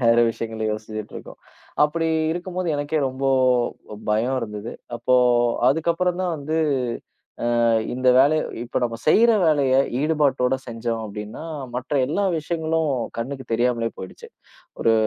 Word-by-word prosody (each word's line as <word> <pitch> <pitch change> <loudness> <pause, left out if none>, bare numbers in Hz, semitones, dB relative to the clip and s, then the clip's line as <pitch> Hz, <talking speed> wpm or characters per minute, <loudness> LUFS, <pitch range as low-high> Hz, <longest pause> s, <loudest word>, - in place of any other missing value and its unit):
வேற, 115 -1 +4
விஷயங்களை 110 -1 -4
யோசிச்சிட்டு 110 0 -6
இருக்கோம். - - -11 0.4
அப்படி, 165 +2 +1 0.3
இருக்கும்போது 180 +1 -4
எனக்கே 145 +2 -1
ரொம்ப 130 +1 -4 0.8
பயம் 115 +5 +1
இருந்தது. 105 0 -6 0.2
அப்போ, 120 +2 +1 0.5
அதுக்கப்புறம் 170 +5 +1
தான் 180 -2 -1
வந்து 155 +2 -3 1.1
அ, - - +4 0.3
இந்த 130 +1 +1
வேலை 145 +4 +5 0.3
இப்போ, 120 - -2
நாம 115 -1 -3
செய்ற 225 +9 +6 0.2
வேலையை 140 -4 +3 0.2
ஈடுபாட்டோட 140 -4 +2
செஞ்சோம், 115 -1 -3
அப்படின்னா, 105 +6 -7 0.3
மற்ற 130 +4 -3
எல்லா 200 +9 0
விஷயங்களும் 160 0 -1 0.3
கண்ணுக்கு 130 +3 -4
தெரியாமலேயே 115 0 0
போயிடுச்சு. 95 - -9 0.5
ஒரு 115 - +4
130 Hz, 125 wpm, -23 LUFS, 115-155 Hz, 1.1 s, செய்ற